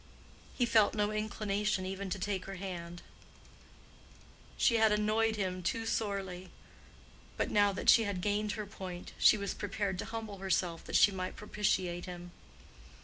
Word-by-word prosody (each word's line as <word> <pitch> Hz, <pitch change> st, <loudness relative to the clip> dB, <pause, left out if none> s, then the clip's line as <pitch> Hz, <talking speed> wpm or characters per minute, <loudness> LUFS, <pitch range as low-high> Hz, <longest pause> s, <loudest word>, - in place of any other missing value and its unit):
He 245 Hz, -, +3 dB
felt 220 Hz, -3 st, +4 dB
no 210 Hz, 0 st, +1 dB
inclination 210 Hz, -2 st, -1 dB
even 195 Hz, +1 st, -4 dB
to 195 Hz, -, -2 dB
take 190 Hz, -1 st, -2 dB
her 195 Hz, -, -6 dB
hand: 175 Hz, -2 st, -6 dB, 1.5 s
she 230 Hz, -, +4 dB
had 220 Hz, -1 st, +4 dB
annoyed 215 Hz, +1 st, +2 dB
him 185 Hz, -3 st, -2 dB
too 225 Hz, +5 st, -1 dB
sorely. 195 Hz, -5 st, -2 dB, 0.9 s
But -, -, -1 dB
now 205 Hz, -1 st, +4 dB
that 195 Hz, -, -5 dB
she 225 Hz, -, +7 dB
had 200 Hz, -3 st, -2 dB
gained 205 Hz, +2 st, 0 dB
her 215 Hz, -, -4 dB
point, 180 Hz, -3 st, -8 dB
she 215 Hz, -, +7 dB
was 200 Hz, -1 st, -3 dB
prepared 200 Hz, -2 st, -3 dB
to -, -, -3 dB
humble 220 Hz, -3 st, -6 dB
herself 185 Hz, -3 st, -1 dB
that -, -, -4 dB
she 205 Hz, -, +7 dB
might 185 Hz, -1 st, -4 dB
propitiate 185 Hz, -4 st, -1 dB
him. 175 Hz, -1 st, -8 dB
200 Hz, 155 wpm, -32 LUFS, 185-210 Hz, 1.5 s, she